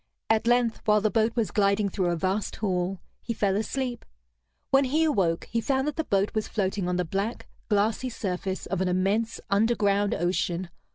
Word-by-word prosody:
At 220 Hz, +1 st, +2 dB
length, 240 Hz, -1 st, +2 dB
while 210 Hz, 0 st, +5 dB
the 210 Hz, 0 st, +1 dB
boat 225 Hz, 0 st, +1 dB
was 230 Hz, -3 st, 0 dB
gliding 200 Hz, 0 st, +2 dB
through 190 Hz, -1 st, -1 dB
a 175 Hz, -, +1 dB
vast 190 Hz, +5 st, -1 dB
hall, 185 Hz, -2 st, -1 dB, 0.2 s
he 230 Hz, -, -4 dB
fell 195 Hz, -2 st, +1 dB
asleep. 240 Hz, +3 st, -2 dB, 0.7 s
When 270 Hz, 0 st, +5 dB
he 300 Hz, +5 st, +2 dB
awoke, 190 Hz, -, +1 dB
he 230 Hz, -, +1 dB
found 265 Hz, +2 st, 0 dB
that 300 Hz, -, -2 dB
the 320 Hz, -, -1 dB
boat 200 Hz, -6 st, +1 dB
was 215 Hz, -1 st, -1 dB
floating 195 Hz, -2 st, -1 dB
on 180 Hz, -, 0 dB
the 180 Hz, 0 st, 0 dB
black, 200 Hz, +7 st, -3 dB, 0.2 s
glassy 215 Hz, +4 st, +1 dB
surface 190 Hz, -4 st, -3 dB
of 190 Hz, -1 st, -2 dB
an 190 Hz, -, +1 dB
immense 195 Hz, +5 st, 0 dB
underground 205 Hz, -1 st, +2 dB
ocean. 175 Hz, 0 st, -1 dB
205 Hz, 185 wpm, -27 LUFS, 190-230 Hz, 0.7 s, while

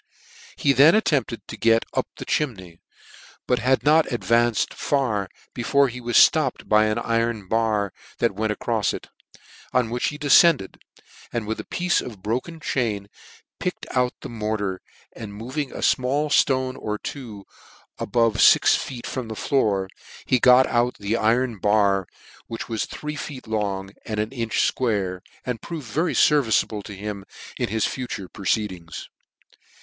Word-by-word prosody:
He 140 Hz, -, +2 dB
then 145 Hz, -, +7 dB
attempted 135 Hz, -, 0 dB
to -, -, -7 dB
get 115 Hz, 0 st, +3 dB
up -, -, 0 dB
the -, -, -7 dB
chimney; 95 Hz, -, -2 dB, 0.7 s
but 125 Hz, -1 st, +1 dB
had 130 Hz, +3 st, +2 dB
not 155 Hz, +1 st, +4 dB
advanced 120 Hz, -1 st, +1 dB
far 110 Hz, -9 st, -1 dB, 0.2 s
before 140 Hz, +3 st, +2 dB
he 125 Hz, +1 st, -8 dB
was 120 Hz, 0 st, +7 dB
flopped 155 Hz, -6 st, -2 dB
by 105 Hz, 0 st, +4 dB
an 110 Hz, 0 st, 0 dB
iron 115 Hz, -3 st, -1 dB
bar 105 Hz, -3 st, 0 dB, 0.2 s
that 115 Hz, -3 st, +1 dB
went 110 Hz, +2 st, -1 dB
acrofs 110 Hz, 0 st, -1 dB
ic; -, -, -10 dB, 0.6 s
on 125 Hz, -3 st, +1 dB
which 120 Hz, 0 st, 0 dB
he 145 Hz, -, -4 dB
deicend 150 Hz, -, +5 dB
ed, 95 Hz, -, -14 dB, 0.5 s
and 115 Hz, -2 st, -2 dB
with 110 Hz, +1 st, -3 dB
a -, -, -4 dB
piece 175 Hz, -1 st, 0 dB
of -, -, -7 dB
his -, -, -16 dB
broken 125 Hz, -, -3 dB
chain 110 Hz, -9 st, -2 dB, 0.5 s
picked -, -, -3 dB
out 125 Hz, -1 st, +1 dB
the -, -, -6 dB
mortar, 105 Hz, -4 st, -3 dB, 0.3 s
and 100 Hz, -2 st, -8 dB
moving 130 Hz, +6 st, -4 dB
a -, -, -6 dB
fmall 140 Hz, +4 st, +1 dB
ftone 130 Hz, -2 st, +2 dB
or 105 Hz, 0 st, -3 dB
two, 110 Hz, -6 st, -8 dB, 0.5 s
about 115 Hz, -3 st, +1 dB
fix -, -, +6 dB
foot 125 Hz, -3 st, -5 dB
from 130 Hz, -3 st, -4 dB
the 110 Hz, -, -6 dB
floor, 105 Hz, -7 st, +1 dB, 0.4 s
he 130 Hz, -, +2 dB
got 125 Hz, +2 st, +6 dB
out 120 Hz, +1 st, +1 dB
the 100 Hz, +2 st, -1 dB
iron 115 Hz, 0 st, +1 dB
bar, 100 Hz, -2 st, +2 dB, 0.4 s
which 115 Hz, -, -6 dB
was 110 Hz, -2 st, -2 dB
three 150 Hz, 0 st, -6 dB
feet 140 Hz, -2 st, -7 dB
long 100 Hz, -3 st, -2 dB, 0.2 s
and 110 Hz, -1 st, -3 dB
an 105 Hz, +1 st, -1 dB
inch 115 Hz, -4 st, 0 dB
fquare 100 Hz, -7 st, -1 dB, 0.3 s
and 125 Hz, -3 st, -3 dB
proved 160 Hz, -5 st, -6 dB
very 155 Hz, +6 st, -1 dB
ferviceable 115 Hz, -8 st, +3 dB
to 100 Hz, 0 st, -9 dB
him 100 Hz, 0 st, -6 dB, 0.4 s
in -, -, -1 dB
his 110 Hz, +1 st, 0 dB
future 120 Hz, -7 st, -4 dB
proceedings. 95 Hz, -3 st, -3 dB
115 Hz, 160 wpm, -23 LUFS, 105-130 Hz, 0.7 s, then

